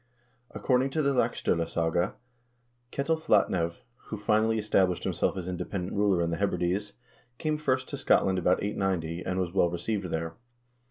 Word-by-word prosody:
According 130 +1 +1
to 155 - +3
the 140 0 +2
"Laxd0lasaga," 85 -7 0 0.8
Ketil 160 +3 0
Flatnev, 85 - +2 0.2
who 110 - -5
finally 110 +2 +2
established 95 -4 +1
him - - 0
self - - 0
as 90 -1 -4
independent 90 +1 -4
ruler 100 -4 +2
in 85 - -1
the 85 - -1
Hebrides, 100 +1 -1 0.4
came 155 -1 -1
first 130 -3 0
to 140 - -4
Scotland 95 -8 +3
about 90 +1 +2
890, 90 -5 -1
and 95 0 -2
was 90 -2 -2
well 90 -3 +3
received 95 +4 -2
there. 80 0 -3
95 Hz, 155 wpm, -28 LUFS, 85-110 Hz, 0.8 s, to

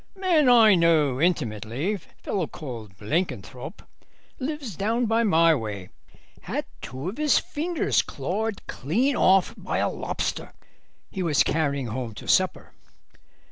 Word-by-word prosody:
'Man 345 -8 +3
I 225 -4 +7
know 155 -6 +3
intimately, 140 - 0
fellow 190 -1 -5
called 115 - -9
Blenkinthrope, 160 - -3 0.6
lives 275 - -4
down 225 +6 0
my 195 -8 +4
way, 105 -8 -4 0.5
had - - -3 0.2
two 130 +5 -6
of 205 - -8
his 305 -2 +4
fingers 325 +3 0
clawed 220 -1 -4
clean 240 - 0
off 190 -3 +4
by - - -3
a - - +1
lobster - - -4 0.6
he 190 - -4
was 165 -5 +3
carrying 140 -4 0
home 115 -1 -5
to - - -10
supper. - - +1
170 Hz, 125 wpm, -25 LUFS, -, 0.6 s, I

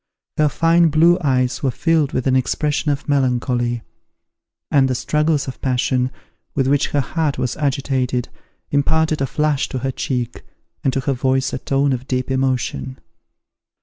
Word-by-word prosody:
Her 150 -1 +3
fine 165 +3 +3
blue 165 +4 +4
eyes 130 -4 +1
were 135 - +1
filled 155 +2 +1
with 130 - -2
an 130 -1 +3
expression 150 +4 0
of 145 0 -2
melancholy; 125 -4 0 0.9
and 135 -2 +4
the 130 - -1
struggles 150 +4 0
of 130 - -7
passion, 125 0 +1 0.5
with 135 - +1
which 140 +2 +2
her 145 - 0
heart 155 +1 -1
was 125 -1 -1
agitated, 135 -4 -1 0.4
imparted 155 +2 +1
a 135 - +1
flush 150 0 0
to - - -4
her 135 - 0
cheek, 125 -2 -3 0.4
and 135 - +2
to 135 - 0
her 135 +1 0
voice 130 +1 0
a - - -2
tone 135 +1 +1
of 130 +1 -5
deep 130 0 -2
emotion. 125 - -1
135 Hz, 160 wpm, -20 LUFS, 125-150 Hz, 0.9 s, blue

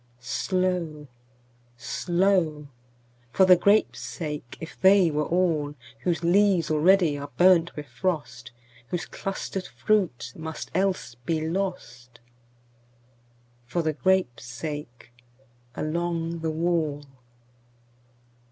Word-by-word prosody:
Slow, 170 +2 -2 0.7
slow! 170 -1 0 0.6
For 190 - +5
the 185 -1 +8
grapes' 200 +4 +3
sake, 150 -7 -6
if 160 - -10
they 190 -3 +6
were 150 0 -1
all, 160 -5 0 0.2
Whose 170 +3 -1
leaves 185 -1 +3
already 160 -1 +4
are 145 - -7
burnt 175 -2 +5
with 150 - -6
frost, 125 -3 -3 0.4
Whose 175 +5 -3
clustered 195 -1 -5
fruit 125 - 0
must 160 -1 -7
else 190 -8 0
be 155 +7 -2
lost—For 120 -4 -8
the 155 -1 0
grapes' 185 -7 +1
sake 125 0 -7 0.6
along 170 +1 -2
the 160 0 -2
wall. 155 -3 -1
160 Hz, 95 wpm, -26 LUFS, 125-180 Hz, 0.7 s, the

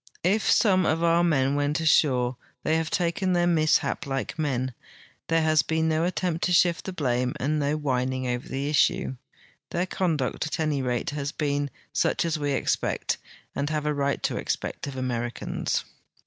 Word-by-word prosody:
If 200 +4 +2
some 190 -5 +4
of 165 +1 +1
our 170 0 +4
men 140 -5 +2
went 145 +2 0
ashore, 130 -6 +3 0.3
they 155 - +2
have 160 -1 -1
taken 180 +1 0
their 175 0 +3
mishap 160 -1 +2
like 135 +3 -3
men; 130 -4 -1 0.5
there 165 0 +2
has 155 -1 +4
been 160 0 0
no 160 +1 +1
at 180 - -2
tempt 175 -2 -1
to 180 - 0
shift 175 0 +3
the 190 - -3
blame 125 -7 0
and 150 +4 0
no 145 +1 0
whining 130 -3 -1
over 125 0 -3
the 135 +1 -2
issue. 145 -3 +2 0.6
'I'heir 175 +1 0
conduct, 160 -7 -1
at 155 - -4
any 155 -3 0
rate, 125 -1 -1
has 145 0 -3
been 145 -1 -1 0.2
such - - +1
as 160 -2 -1
we 145 -1 0
expect, - - -1 0.3
and 140 +1 -2
have 155 -1 -2
a 150 - +1
right 140 -1 -1
to - - 0
expect - - -3
of 140 - -6
Americans. 120 -2 -2
150 Hz, 180 wpm, -26 LUFS, 135-165 Hz, 0.6 s, some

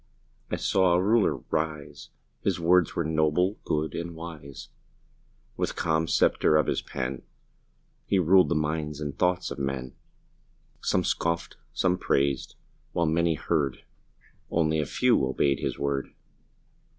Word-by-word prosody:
I - - -1
saw 95 -2 +2
another 90 +1 +3
Ruler 105 -6 +3 0.2
rise 75 -2 -3 0.3
His - - 0
words 85 0 +3
were 85 - 0
noble, 80 +5 +1
good, 75 +1 -1
and 85 0 -5
wise; 80 -5 -9 0.9
With - - -1
the - - -8
calm 80 0 0
sceptre 75 - +3
of 75 - +3
his - - -1
pen 65 -1 -4 0.9
He 100 - +2
ruled 95 +1 +5
the - - +1
minds 75 -1 -2
and 75 -2 -4
thoughts 90 +1 0
of - - -5
men; 65 -2 -3 0.9
Some - - +1
scoffed, 85 0 -1
some 90 0 +1
praised 70 -4 0 0.4
while 85 - +1
many 80 +1 +2
heard, 70 -4 -1 0.7
Only 80 -1 +1
a 75 - -1
few - - +2
obeyed 65 +1 +1
his - - -3
word. 70 -1 -2
80 Hz, 140 wpm, -27 LUFS, 70-85 Hz, 0.9 s, ruled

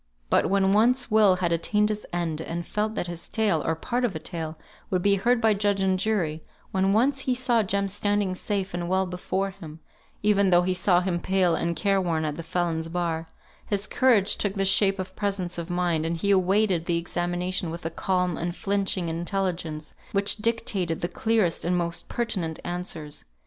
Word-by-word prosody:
But - - +4
when 195 0 +2
once 245 +3 +3
Will 210 -3 +5
had 180 -2 -1
attained 210 +6 +2
his 210 -1 -4
end, 170 -3 -2
and 170 +1 -4
felt 215 +3 -2
that - - -1
his 175 -1 -7
tale, 205 -8 +1
or 160 - 0
part 245 +9 -2
of 225 -8 0
a - - -3
tale, 160 -1 -5 0.3
would 180 -2 0
be 200 - +4
heard 235 +5 +2
by 220 -2 +4
judge 205 -1 +1
and 190 -1 +1
jury; 175 -7 -1 0.3
when 190 +1 +2
once 260 +6 +2
he 260 -1 0
saw 245 -2 +2
Jem 200 0 0
standing 205 -1 0
safe 195 0 -2
and 175 0 -3
well 190 +1 +2
before 185 +2 -2
him 165 -5 -11 0.4
(even 200 -2 +4
though 175 -1 +5
he 185 +1 +1
saw 180 0 +3
him 180 -2 -1
pale 185 -1 +2
and 170 +1 -1
care 195 +3 +1
worn 165 -3 0
at 150 -1 -2
the 165 - -5
felon's 165 -1 -2
bar); 165 -2 -2 0.4
his 200 -1 0
courage 220 -6 +3
took 205 -1 0
the 195 -1 +1
shape 195 0 +4
of 185 0 -6
presence 195 -4 -2
of 170 +1 -6
mind, 175 -3 0
and 165 +1 -1
he 200 +5 +1
awaited 190 -2 +2
the 170 -2 +2
examination 175 +1 -1
with 170 +1 -7
a 165 - -2
calm, 180 0 -1
unflinching 190 +1 -1
intelligence, 170 -2 -3 0.2
which 200 +1 +2
dictated 210 -6 -1
the 175 - 0
clearest 210 -1 0
and 180 +1 +1
most 170 0 -3
pertinent 190 -9 -2
answers. 175 -4 -4
185 Hz, 195 wpm, -26 LUFS, 170-205 Hz, 0.4 s, Will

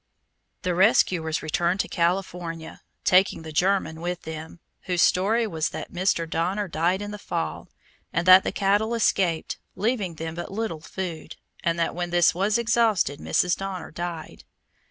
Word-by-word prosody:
The 180 -1 0
rescuers 175 -4 +3
returned 170 +4 0
to - - -5
California, 170 -2 -2 0.2
taking 185 -2 +3
the 160 - -7
German 165 -1 +1
with 175 0 -3
them, 160 +1 -8 0.3
whose 180 -1 +2
story 220 +6 +3
was 160 -7 -1
that - - -7
Mr. 180 -2 +1
Donner 180 +6 -1
died 175 +4 0
in 205 - -6
the 210 - -7
fall, 80 - -4 0.4
and 170 +1 -1
that 185 +1 +9
the - - -1
cattle 205 +4 +1
escaped, 185 -7 +1 0.2
leaving 205 -5 -1
them 160 +1 -5
but 175 +2 -6
little 200 -6 -3
food, 175 -2 -6 0.3
and 170 0 +1
that 170 - 0
when 175 0 -3
this 175 -1 +4
was 200 +5 +1
exhausted 225 - +2
Mrs. 180 0 +1
Donner 195 -2 -6
died. 170 0 -6
180 Hz, 155 wpm, -25 LUFS, 165-195 Hz, 0.4 s, that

